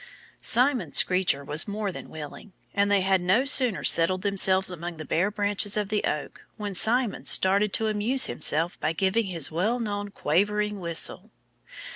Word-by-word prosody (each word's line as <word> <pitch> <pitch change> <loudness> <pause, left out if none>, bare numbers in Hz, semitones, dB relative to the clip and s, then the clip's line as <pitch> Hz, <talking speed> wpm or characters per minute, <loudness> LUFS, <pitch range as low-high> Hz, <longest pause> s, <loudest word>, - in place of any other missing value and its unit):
Simon 250 +1 +2
Screecher 180 -6 +2
was 150 +2 -2
more 205 -1 -4
than - - -10
willing. 155 +6 -10 0.2
And 200 0 +1
they 200 -1 +2
had 190 -1 +1
no 190 +9 +1
sooner 255 -7 +2
settled 185 +3 +3
themselves 190 -2 +2
among 175 -1 -7
the 155 - -8
bare 180 +7 0
branches 205 0 -1
of 205 -2 -2
the 215 -1 -1
oak 150 - -5 0.2
when 205 -2 -5
Simon 230 +4 +2
started 200 +2 +3
to 220 - 0
amuse 220 +5 +2
himself 160 +3 -1
by 155 - -2
giving 195 +5 0
his 170 -6 0
well 210 +10 -1
known 205 -2 -4
quavering 205 +4 -1
whistle. 170 -2 -2
200 Hz, 165 wpm, -25 LUFS, 175-210 Hz, 0.2 s, settled